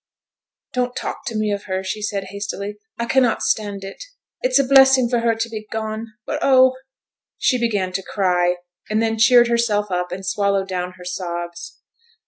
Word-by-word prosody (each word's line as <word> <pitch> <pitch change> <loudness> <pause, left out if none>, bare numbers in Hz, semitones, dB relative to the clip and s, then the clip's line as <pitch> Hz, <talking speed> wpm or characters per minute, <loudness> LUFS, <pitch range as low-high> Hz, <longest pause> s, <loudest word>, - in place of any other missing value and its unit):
'Don't 250 0 -1
talk - - -5
to 230 - -3
me 215 -1 0
of 200 0 -3
her,' 190 -1 -2
she 190 +3 -4
said 205 -2 -2
hastily. 200 0 -5 0.2
'I 235 - -2
cannot 245 -1 +2
stand 205 -2 -1
it. 195 - -8 0.4
It's 255 +1 +3
a 275 - +4
blessing 265 -1 +6
for 240 0 +1
her 230 -1 +1
to 225 +1 -2
be 215 -2 -7
gone, 220 0 -4 0.2
but, - - -3
oh 260 -1 +5 0.3
' - - -72 0.3
She 255 - +2
began 205 -6 0
to 195 - -2
cry, 180 -3 +1 0.3
and 215 0 +1
then 225 0 0
cheered 240 +1 +6
herself 220 -4 +1
up, 180 0 -1
and 190 +1 -6
swallowed 200 0 0
down 180 -1 -3
her 180 -1 -13
sobs. 175 -1 -6
210 Hz, 185 wpm, -21 LUFS, 190-235 Hz, 0.4 s, blessing